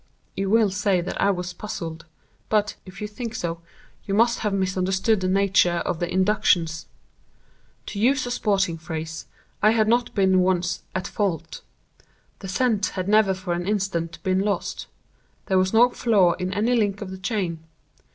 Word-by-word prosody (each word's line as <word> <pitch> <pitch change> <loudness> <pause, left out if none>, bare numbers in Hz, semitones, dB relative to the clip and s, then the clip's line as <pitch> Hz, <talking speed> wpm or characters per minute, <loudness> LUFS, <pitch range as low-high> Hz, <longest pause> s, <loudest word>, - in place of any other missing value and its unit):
"You 195 0 -1
will 220 -1 +4
say 195 -1 +1
that 175 - -4
I - - +4
was 180 -2 -2
puzzled; 165 -5 -6 0.4
but, 210 -1 +1
if 185 +3 -11
you - - -2
think 225 +2 -6
so, 170 -5 -3 0.4
you 195 - -2
must 235 +2 +3
have 210 - -1
misunderstood 190 +2 +1
the 185 - -1
nature 185 -2 +2
of 170 - -2
the 175 - -2
inductions. 185 -4 +1 1.0
To 200 - -6
use 260 +4 +2
a 245 - -4
sporting 195 -8 0
phrase, 160 0 -6 0.3
I 215 - +6
had 220 -1 +2
not 240 +2 +1
been 190 -2 +4
once 180 -1 +1
'at 185 0 -2
fault.' 195 -6 -3 0.8
The 195 - -8
scent 215 +1 +1
had 185 0 -2
never 210 -2 +4
for 185 -1 -3
an 175 +1 -3
instant 185 -5 -1
been 185 0 +1
lost. 200 +1 -2 0.6
There 190 -1 +2
was 185 0 +1
no 240 +2 +5
flaw 200 -9 +3
in 180 +1 -4
any 220 +5 +1
link 205 -3 0
of 190 - -8
the 190 - -8
chain. 185 -5 -2
190 Hz, 170 wpm, -24 LUFS, 180-210 Hz, 1.0 s, I